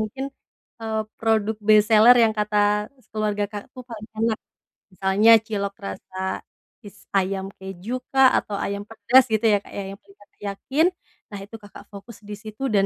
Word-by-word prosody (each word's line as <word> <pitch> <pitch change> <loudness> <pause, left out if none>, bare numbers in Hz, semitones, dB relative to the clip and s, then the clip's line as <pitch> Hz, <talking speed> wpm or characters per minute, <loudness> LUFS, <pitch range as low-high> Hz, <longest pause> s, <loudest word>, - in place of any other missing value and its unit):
mungkin, 240 +6 -4 0.6
eee, 220 -1 -2 0.2
produk 220 -1 +1
best 215 -1 +6
seller 225 +3 +8
yang 220 - +3
kata 210 0 -1 0.5
s - - -30
keluarga 210 -1 -1
Kakak 205 -1 -8
tuh, 255 - -9
paling 215 -1 -8
enak. 225 -1 +1 0.6
Misalnya 195 +4 +4
cilok 200 -2 -3
rasa 100 - -8 0.7
is 205 0 -12 0.2
ayam 190 0 -1
kejukah, 240 +8 +1
atau 205 - -3
ayam 200 0 -3
pedas, 240 +3 +4
gitu 220 +1 +1
ya, - - +5
Kak, - - -16
ya, 200 - -3
yang 200 - -11
paling 200 0 -22
Kakak 205 - -23
yakin. 270 +10 0 0.5
Nah, 200 - -5
itu 205 +3 -11
Kakak 205 0 -12
fokus 200 +2 -11
di 210 - -5
situ, 215 +2 -11
dan 195 -1 +4
210 Hz, 175 wpm, -23 LUFS, 200-225 Hz, 0.7 s, seller